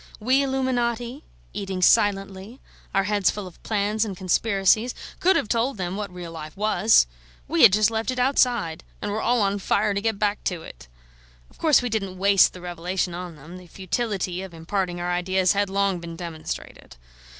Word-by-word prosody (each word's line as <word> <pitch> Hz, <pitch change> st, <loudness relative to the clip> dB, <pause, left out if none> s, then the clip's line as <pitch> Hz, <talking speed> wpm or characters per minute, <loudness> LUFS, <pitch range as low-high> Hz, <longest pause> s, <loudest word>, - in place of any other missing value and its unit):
We 255 Hz, +5 st, +3 dB
illuminati, 255 Hz, -1 st, -1 dB, 0.3 s
eating 195 Hz, -2 st, -3 dB
silently, 195 Hz, +4 st, +2 dB, 0.3 s
our 195 Hz, -, +2 dB
heads 205 Hz, -2 st, +2 dB
full 205 Hz, -2 st, -4 dB
of 180 Hz, -, -13 dB
plans 210 Hz, 0 st, 0 dB
and 200 Hz, -4 st, -5 dB
conspiracies, 200 Hz, +4 st, +2 dB, 0.2 s
could 380 Hz, +2 st, +4 dB
have -, -, +1 dB
told 235 Hz, +3 st, 0 dB
them 180 Hz, 0 st, -3 dB
what 205 Hz, -2 st, -5 dB
real 175 Hz, -2 st, -8 dB
life 155 Hz, 0 st, -9 dB
was. 215 Hz, -, +4 dB, 0.4 s
We -, -, +1 dB
had -, -, +9 dB
just 215 Hz, +2 st, +3 dB
left 225 Hz, +1 st, -2 dB
it 255 Hz, -, -2 dB
outside, 245 Hz, -, +1 dB, 0.2 s
and 205 Hz, -, -4 dB
were 215 Hz, +2 st, -2 dB
all 240 Hz, -3 st, +2 dB
on 200 Hz, 0 st, 0 dB
fire 205 Hz, +2 st, +1 dB
to 200 Hz, -, -1 dB
get 225 Hz, -1 st, -1 dB
back 205 Hz, 0 st, -1 dB
to 175 Hz, -3 st, -2 dB
it. -, -, -12 dB, 0.6 s
Of -, -, -23 dB
course 305 Hz, -6 st, +4 dB
we 245 Hz, -, -1 dB
didn't 195 Hz, -4 st, -3 dB
waste 195 Hz, 0 st, +4 dB
the 180 Hz, -, -11 dB
revelation 175 Hz, +1 st, -3 dB
on 175 Hz, -1 st, -7 dB
them; 155 Hz, +5 st, -11 dB
the 180 Hz, -1 st, -13 dB
futility 190 Hz, -1 st, -3 dB
of 190 Hz, -3 st, -9 dB
imparting 175 Hz, +2 st, -3 dB
our 175 Hz, 0 st, -2 dB
ideas 185 Hz, +1 st, +1 dB
had 200 Hz, 0 st, 0 dB
long 195 Hz, -2 st, 0 dB
been 170 Hz, -1 st, -8 dB
demonstrated. 165 Hz, -, -7 dB
200 Hz, 185 wpm, -24 LUFS, 180-220 Hz, 0.6 s, had